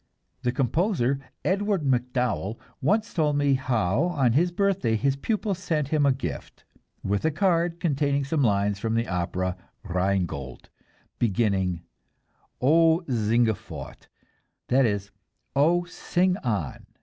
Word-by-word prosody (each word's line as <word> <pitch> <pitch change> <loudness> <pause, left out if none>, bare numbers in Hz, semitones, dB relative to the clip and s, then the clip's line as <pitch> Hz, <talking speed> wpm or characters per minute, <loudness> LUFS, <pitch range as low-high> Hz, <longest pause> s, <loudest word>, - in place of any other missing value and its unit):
The 125 - 0
composer, 135 - +1 0.3
Edward 200 -2 +1
MacDowell, 125 -4 0 0.2
once 210 +9 +1
told 150 -3 +1
me 145 -1 +3
how 125 - +1
on 140 -9 +2
his 175 +7 +3
birthday 195 - +1
his 135 +5 +1
pupils 200 +4 -2
sent 155 -6 -1
him 150 -2 +2
a - - +5
gift, 135 +1 -6 0.4
with 100 0 -1
a 160 - +3
card 170 0 +1
containing 140 -4 +1
some 145 +2 0
lines 100 -4 +1
from 115 +1 -1
the 115 +1 0
opera 90 +1 -2 0.3
"Rheingold," 90 - -2 0.5
beginning, 95 -6 0 0.8
"O 165 +5 +4
singe 115 -2 +2
fort" - - -10 0.6
that 130 0 +4
is, 100 -1 -3 0.4
"Oh, 165 +5 +3
sing 180 +1 0
on." 105 - -3
135 Hz, 125 wpm, -26 LUFS, 105-165 Hz, 0.8 s, a